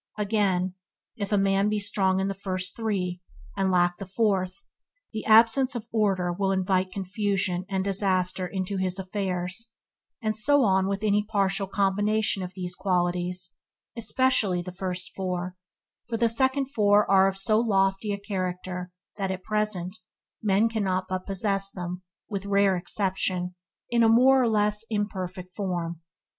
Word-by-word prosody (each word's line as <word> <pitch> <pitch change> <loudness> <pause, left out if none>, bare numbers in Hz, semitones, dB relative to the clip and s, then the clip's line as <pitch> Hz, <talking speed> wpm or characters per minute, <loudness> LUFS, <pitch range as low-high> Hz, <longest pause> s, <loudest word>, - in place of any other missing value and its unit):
Again, 195 -3 +1 0.4
if 205 -3 -4
a 205 - +3
man 195 +1 +2
be 210 - 0
strong 190 -2 +1
in 190 - 0
the 195 - -1
first 185 -1 -3
three, 185 -6 -2 0.3
and 190 - +1
lack 175 -1 +2
the 195 - -6
fourth, 195 -2 0 0.5
the 215 - -4
absence 230 +4 +5
of 235 -2 -4
order 195 -5 +1
will 195 +2 0
invite 185 0 +1
confusion 190 -2 -1
and 190 -1 0
disaster 185 -2 0
into 190 +1 -3
his 185 -1 -1
affairs; 190 +3 -3 0.5
and 215 -3 -1
so 285 +6 +4
on 190 -3 +3
with 200 +1 -2
any 210 -1 +2
partial 195 -2 0
combination 205 +1 +1
of 180 0 -6
these 180 -2 -5
qualities, 180 -1 -1 0.4
especially 225 -6 +2
of - - -11
the 180 - -5
first 180 0 -4
four, 180 -1 -3 0.5
for 230 - -1
the 230 +1 +3
second 265 +3 +1
four 210 -4 +4
are 195 -1 +5
of 195 0 0
so 215 +2 +5
lofty 195 -2 +1
a 200 - -1
character 185 -2 -4 0.3
that 195 -2 -2
at 185 0 -4
present 210 -3 -2 0.4
men 210 +1 +3
can 220 -3 -2 0.2
but 185 0 -3
possess 195 0 0
them, 180 -1 -6 0.3
with 200 -1 -4
rare 200 -1 +3
exceptions, 185 -1 -1 0.4
in 235 -1 +3
a 225 - +5
more 260 +3 +6
or 240 - +2
less 210 0 +2
imperfect 185 -4 -4
form. 175 -4 -3
195 Hz, 155 wpm, -26 LUFS, 185-210 Hz, 0.5 s, more